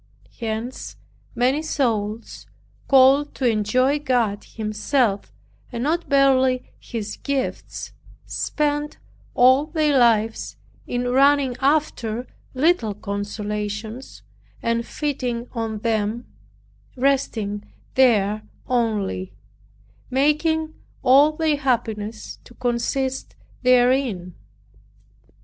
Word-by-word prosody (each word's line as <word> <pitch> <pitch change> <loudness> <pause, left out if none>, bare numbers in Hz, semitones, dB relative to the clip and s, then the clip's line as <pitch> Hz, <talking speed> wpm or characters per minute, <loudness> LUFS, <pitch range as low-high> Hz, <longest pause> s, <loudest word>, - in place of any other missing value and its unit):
Hence 230 +2 -4 0.4
many 260 +5 +2
souls, 230 -8 -2 0.4
called 275 +2 +5
to 265 - -2
enjoy 250 +6 +2
God 240 -7 0
Himself, 215 0 -1 0.4
and 235 -1 -3
not 335 +4 -1
barely 265 -2 +3
His 220 -3 -6
gifts, 275 -2 -4 0.3
spend 295 0 -2 0.4
all 260 +4 +5
their 310 -3 +1
lives 225 -2 +2 0.3
in 245 0 -2
running 275 0 +4
after 265 -5 0 0.3
little 255 - +2
consolations, 210 +3 -5 0.4
and 230 0 0
feeding 250 -5 -3
on 225 -2 -3
them 220 +1 -1 0.7
resting 240 -6 -1 0.2
there 215 -5 +3 0.2
only, 215 -6 -1 0.8
making 310 +4 +1 0.3
all 275 +4 +6
their 310 -1 +1
happiness 225 -5 -2
to 240 - -16
consist 255 +3 -2 0.3
therein. 250 -7 +2
245 Hz, 85 wpm, -22 LUFS, 220-275 Hz, 0.8 s, all